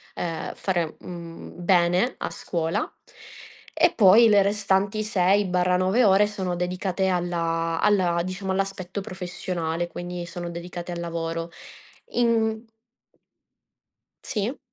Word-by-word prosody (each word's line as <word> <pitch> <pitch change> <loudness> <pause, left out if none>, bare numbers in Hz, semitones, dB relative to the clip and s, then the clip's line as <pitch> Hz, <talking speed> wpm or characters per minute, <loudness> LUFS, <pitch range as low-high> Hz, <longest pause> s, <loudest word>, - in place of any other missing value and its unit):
ehm, 165 -2 -4
fare, 175 -5 -1
mhmm, 170 -2 -9
bene 180 +5 +2
a - - -2
scuola; 170 -9 -2 0.8
e - - +4
poi 220 +2 +7
le 205 -1 +6
restanti 200 +1 +1
6/9 185 +1 +2
ore 195 +1 +5
sono 190 -4 -3
dedicate 185 +2 -1
alla 165 -2 -1
alla, 180 -5 +3
diciamo, 185 +1 -4
all'aspetto 195 0 -3
professionale, 175 -3 -3
quindi 175 +1 -6
sono 175 0 -6
dedicate 175 +1 -6
al 170 - -5
lavoro. 165 0 -3 0.6
In 225 -2 +1 1.6
Sì? 220 +5 -2
180 Hz, 105 wpm, -25 LUFS, 175-200 Hz, 1.6 s, poi